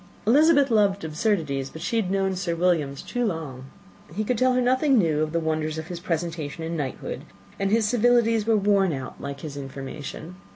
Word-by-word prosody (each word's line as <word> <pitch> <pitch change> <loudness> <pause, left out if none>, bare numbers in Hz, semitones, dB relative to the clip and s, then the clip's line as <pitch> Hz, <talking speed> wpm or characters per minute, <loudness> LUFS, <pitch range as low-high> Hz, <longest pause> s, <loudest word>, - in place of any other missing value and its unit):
Elizabeth 285 +3 +5
loved 200 -4 +3
absurdities, 155 -5 -1
but 160 - -10
she 230 - -1
had 210 -5 0
known 195 0 0
Sir 180 -2 -2
William's 165 -6 0
too 245 - -2
long. 155 - -4 0.5
He 215 - 0
could 245 +4 0
tell 255 +3 +3
her 250 - +2
nothing 260 +2 +3
new 160 -7 +2
of 155 0 -1
the 170 - 0
wonders 155 -1 -1
of 160 +1 -6
his 175 -1 -5
presentation 165 -2 -3
and 165 +1 -3
knighthood; 140 -5 -4 0.4
and 195 0 +1
his 220 0 +2
civilities 230 -1 +3
were 225 -1 +4
worn 195 -3 +3
out, 130 -2 -7
like 140 0 -6
his 150 -3 -7
information. 140 +5 -7
180 Hz, 195 wpm, -25 LUFS, 155-220 Hz, 0.5 s, Elizabeth